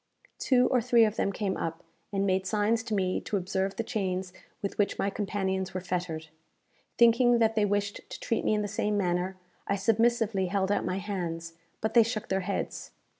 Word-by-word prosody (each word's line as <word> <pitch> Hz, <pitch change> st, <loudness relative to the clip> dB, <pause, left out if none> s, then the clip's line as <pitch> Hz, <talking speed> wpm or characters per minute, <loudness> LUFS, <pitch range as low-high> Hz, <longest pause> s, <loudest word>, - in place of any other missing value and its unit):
Two 250 Hz, -2 st, +4 dB
or 250 Hz, -2 st, +3 dB
three 235 Hz, -1 st, +5 dB
of 215 Hz, 0 st, -1 dB
them 200 Hz, -, 0 dB
came 195 Hz, -1 st, -2 dB
up, 165 Hz, 0 st, -4 dB, 0.3 s
and 195 Hz, -1 st, 0 dB
made 190 Hz, 0 st, +1 dB
signs 215 Hz, +2 st, +1 dB
to 225 Hz, -2 st, -3 dB
me 185 Hz, -2 st, 0 dB
to 205 Hz, -, -2 dB
observe 190 Hz, +1 st, -1 dB
the 230 Hz, -, -2 dB
chains 185 Hz, -4 st, -2 dB, 0.3 s
with 200 Hz, -, -5 dB
which 205 Hz, -, +1 dB
my 200 Hz, -, 0 dB
companions 190 Hz, -2 st, -2 dB
were -, -, 0 dB
fettered. 175 Hz, -3 st, -3 dB, 0.7 s
Thinking 240 Hz, +1 st, +5 dB
that 225 Hz, -1 st, +3 dB
they 215 Hz, -2 st, +2 dB
wished 205 Hz, 0 st, -1 dB
to -, -, -7 dB
treat 230 Hz, -, -1 dB
me 215 Hz, -, +2 dB
in 210 Hz, -, 0 dB
the -, -, -2 dB
same 210 Hz, 0 st, -1 dB
manner, 180 Hz, 0 st, 0 dB, 0.3 s
I 200 Hz, -, +1 dB
submissively 225 Hz, -1 st, +2 dB
held 195 Hz, +1 st, 0 dB
out -, -, +1 dB
my 185 Hz, -, -1 dB
hands; 170 Hz, -4 st, -4 dB, 0.3 s
but 220 Hz, 0 st, -1 dB
they 235 Hz, -, +8 dB
shook 225 Hz, -1 st, -2 dB
their 190 Hz, -, +1 dB
heads. 195 Hz, +1 st, -3 dB
200 Hz, 200 wpm, -29 LUFS, 190-220 Hz, 0.7 s, they